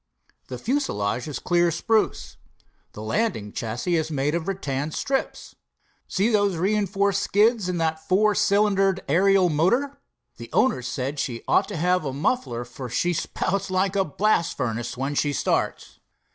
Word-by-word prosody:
The 125 - -6
fuselage 125 - -1
is 145 -4 -4
clear 175 -1 +2
spruce. 215 +7 0 0.6
The 105 - -8
landing 110 - -1
chassis 120 - -2
is 160 0 -1
made 145 0 -1
of 170 0 -2
rattan 145 -7 -2
strips. 270 - -3 0.5
See 200 +4 +1
those 205 -5 +2
reinforced 200 +1 +1
skids, 210 -1 +2
and 175 -1 -2
that 160 -1 -2
four 210 +3 +3
cylindered 195 -2 +2
aerial 190 +4 +4
motor? 240 - +1 0.4
The - - -9
owners 210 - +2
said 130 +3 -3
she 120 -4 -3
ought - - +3
to 205 - -5
have 180 +2 +1
a 135 -3 -3
muffler, 130 - -1
for 125 +1 -8
she 175 +9 0
spouts 190 +4 -2
like 190 +1 0
a 195 - +3
blast 170 +2 0
furnace 120 -1 -3
when 135 +3 -2
she 145 0 0
starts." - - -2
175 Hz, 155 wpm, -24 LUFS, 135-200 Hz, 0.6 s, aerial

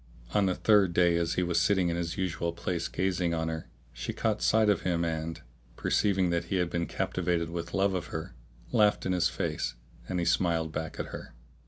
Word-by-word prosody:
On 100 -2 +3
the 90 - +1
third 100 -5 +4
day 85 -1 +4
as 85 0 0
he 90 - +1
was 85 -1 +1
sitting 90 -1 +3
in 85 - -1
his 85 -1 -3
usual 85 -2 -1
place 85 0 -2
gazing 90 -2 0
on 80 0 -1
her, 80 0 -5 0.2
she - - -4
caught 110 -1 0
sight 110 0 +4
of 105 -2 +3
him 85 -2 0
and, 80 -1 -3 0.3
perceiving 95 +2 +2
that 85 0 0
he 90 - -2
had 90 -2 0
been 85 -1 -1
captivated 85 -2 -1
with 85 +1 -4
love 100 0 +2
of 90 -2 -2
her, 80 0 -6 0.4
laughed 105 -4 +3
in 95 - 0
his 90 -1 +2
face[FN#637] 75 -9 -2 0.3
and 90 - -1
he 85 - 0
smiled 85 -2 +1
back 80 0 -5
at - - -3
her. - - -9
85 Hz, 210 wpm, -29 LUFS, 85-95 Hz, 0.4 s, third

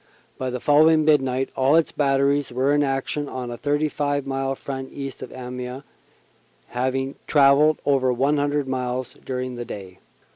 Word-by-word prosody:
By 130 - -2
the 125 0 -3
following 155 +3 +4
midnight 135 -4 +2
all 135 +3 +3
its 165 -1 +3
batteries 140 0 +1
were 130 +3 +1
in 145 - +3
action 140 +1 -1
on 125 -2 -5
a - - -4
35 145 -1 -1
mile 135 0 -2
front 135 0 -6
east 135 -1 -7
of - - -7
Amiens, 125 +1 -6 0.9
having 130 +2 -1
travelled 145 +1 +5
over 135 -2 +2
100 145 +2 +1
miles 125 -1 -3
during 125 -1 -4
the 120 - -5
day. 95 -4 -9
135 Hz, 150 wpm, -23 LUFS, 130-145 Hz, 0.9 s, travelled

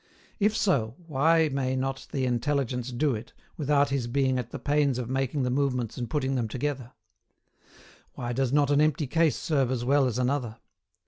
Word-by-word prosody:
If 215 +1 +2
so, 125 - +1
why 160 +2 +3
may 130 -1 -1
not 135 0 -3
the 135 -2 -1
Intelligence 125 0 -1
do 135 +3 +1
it, 110 +1 -7 0.2
without 145 -1 +2
his 135 -3 -1
being 130 +1 +1
at 120 -1 -5
the - - -6
pains 145 -3 +1
of 125 0 -4
making 135 +1 0
the 125 - 0
movements 125 -4 0
and 120 -2 -4
putting 135 -3 -1
them 120 -4 0
together? 130 +1 -4 1.2
Why 120 0 -4
does 130 0 0
not 145 0 +3
an 145 +1 +4
empty 155 0 +2
case 160 +2 +2
serve 140 -7 0
as 125 -2 -2
well 140 +1 +3
as 125 - -2
another? 125 -3 -1
135 Hz, 185 wpm, -27 LUFS, 125-145 Hz, 1.2 s, an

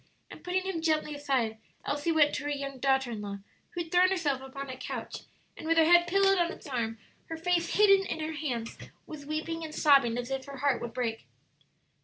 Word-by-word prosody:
And - - -12
putting 365 +1 -1
him 375 -4 -3
gently 310 -2 0
aside, 260 -6 -1 0.3
Elsie 290 +3 -1
went 300 -2 +4
to 290 - -3
her - - -1
young 275 -2 -4
daughter 265 -1 +1
in 215 -2 -5
law, 200 -1 -5 0.4
who 345 - -1
had 330 - -16
thrown 360 +1 +5
herself 300 -8 0
upon 275 +1 -7
a 260 - -6
couch, 255 - -6 0.3
and - - -8
with 330 0 +2
her 325 - +6
head 345 +1 +6
pillowed 390 +1 +3
on 345 0 +1
its - - -11
arm, 235 -5 -2 0.3
her 325 - -5
face 340 +1 0
hidden 395 -2 +5
in 320 - -3
her 315 +1 -3
hands, 255 -7 -4 0.3
was 290 -2 -9
weeping 325 +2 -3
and 310 -1 -7
sobbing 275 -7 +4
as 245 +2 -4
if 270 -1 -3
her 280 -1 -9
heart 275 -1 +1
would 235 0 -6
break. 230 -3 -3
295 Hz, 220 wpm, -29 LUFS, 265-330 Hz, 0.4 s, her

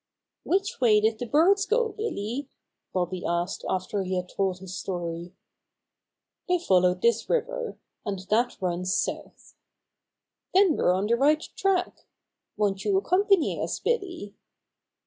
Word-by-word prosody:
"Which 390 -3 -1
way 215 -4 +5
did 220 +1 +1
the 245 - -4
birds 390 - +4
go, 460 +1 +2
Billy?" 280 - -4 0.4
Bobby 180 0 -2
asked 175 +2 -2
after 190 +2 -1
he 185 0 -2
had 180 0 -3
told 190 -2 -1
his 185 0 -8
story. 175 -1 -5 1.1
"They 360 0 +3
followed 180 - +2
this 235 -1 +2
river, - - -1 0.3
and 205 -3 -3
that 240 +3 +2
runs 180 0 -1
south." - - -4 1.0
"Then 380 -5 +5
we're - - +3
on 190 +2 +1
the 235 +2 +2
right 300 +4 +3
track. 370 -2 -1 0.5
Won't 200 -2 0
you 390 - +2
accompany 390 -1 +2
us, - - -2
Billy?" 365 - -2
225 Hz, 135 wpm, -26 LUFS, -, 1.1 s, way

